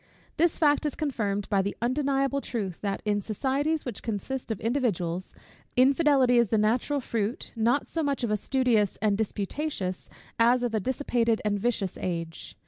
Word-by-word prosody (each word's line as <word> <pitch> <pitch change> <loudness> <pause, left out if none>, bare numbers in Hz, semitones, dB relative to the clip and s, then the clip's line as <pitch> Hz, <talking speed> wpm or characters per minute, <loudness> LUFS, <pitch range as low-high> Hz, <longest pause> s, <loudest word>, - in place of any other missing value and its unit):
This 340 0 +3
fact 295 -1 +3
is 295 - -4
confirmed 210 -9 -2
by 200 -2 +3
the 200 +1 -3
undeniable 275 +2 +1
truth, 200 -10 -4
that 200 -1 -2
in 205 -1 +1
societies, 275 +9 -1
which 245 -5 -5
consist 240 +5 -4
of 220 -4 -2
individuals, 195 -8 -1 0.4
infidelity 265 -2 +4
is 235 - +4
the 220 - +2
natural 235 +7 +1
fruit, 230 -3 -3
not 235 +5 +1
so 330 - -2
much 280 -4 -1
of 230 - 0
a - - +3
studious 235 -4 +1
and 210 -1 +2
disputatious, 205 -1 -3 0.3
as 240 +2 +4
of 240 -2 -1
a 220 - +2
dissipated 235 -1 0
and 205 -1 +1
vicious 205 -4 -1
age. 165 -2 -4
235 Hz, 165 wpm, -27 LUFS, 205-270 Hz, 0.4 s, infidelity